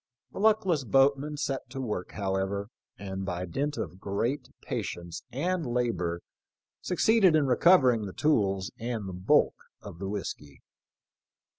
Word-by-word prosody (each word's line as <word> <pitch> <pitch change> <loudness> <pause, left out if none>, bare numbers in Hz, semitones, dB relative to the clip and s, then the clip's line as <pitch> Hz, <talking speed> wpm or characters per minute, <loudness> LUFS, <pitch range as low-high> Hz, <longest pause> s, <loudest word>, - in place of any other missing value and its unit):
The - - -7
luck 215 0 +4
less 165 -7 +1
boatman 140 +3 +2
set 135 -2 -3
to 135 - -6
work 105 -8 -4
however, 100 +1 -2 0.3
and 95 -1 -5
by 90 -1 -3
dint 145 - -2
of 90 - -5
great 110 +9 -2
patience 85 -1 -4
and 170 +7 -1
labor 115 - -1 0.6
succeeded 190 -1 +4
in 155 -2 +3
recovering 130 - +4
the 95 - -8
tools 100 -10 +1
and 115 -3 -3
the 95 - -6
bulk 90 +1 +3 0.3
of 85 - -10
the 95 0 -4
whiskey. 75 -8 -6
115 Hz, 140 wpm, -28 LUFS, 95-145 Hz, 0.6 s, luck